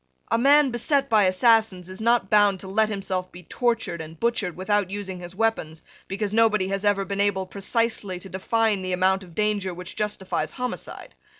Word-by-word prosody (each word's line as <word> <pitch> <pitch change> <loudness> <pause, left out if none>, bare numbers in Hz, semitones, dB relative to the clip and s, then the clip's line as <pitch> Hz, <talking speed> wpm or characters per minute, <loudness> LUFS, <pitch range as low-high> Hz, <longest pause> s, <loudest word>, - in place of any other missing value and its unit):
A - - +3
man 280 +1 +5
beset 275 +3 +1
by 215 -3 +5
assassins 190 -1 +3
is 185 +2 -9
not 235 -2 +2
bound 205 -2 +4
to 190 - -8
let 215 +3 +1
himself 190 -3 -3
be 180 +1 -12
tortured 225 -3 -1
and 160 0 -10
butchered 230 -7 -1
without 200 0 0
using 195 -2 -5
his 175 +1 -9
weapons, 195 -8 -1 0.2
because 200 +1 -3
nobody 215 -4 +3
has 195 0 -2
ever 205 -1 +2
been 200 0 -2
able 195 -2 +1
precisely 200 0 -2
to 180 - -10
define 210 +2 0
the 185 0 -3
amount 190 +1 +2
of 175 -3 -15
danger 205 -4 -1
which 180 0 -8
justifies 210 -3 -2
homicide. 250 -1 -6
200 Hz, 185 wpm, -24 LUFS, 185-225 Hz, 0.2 s, man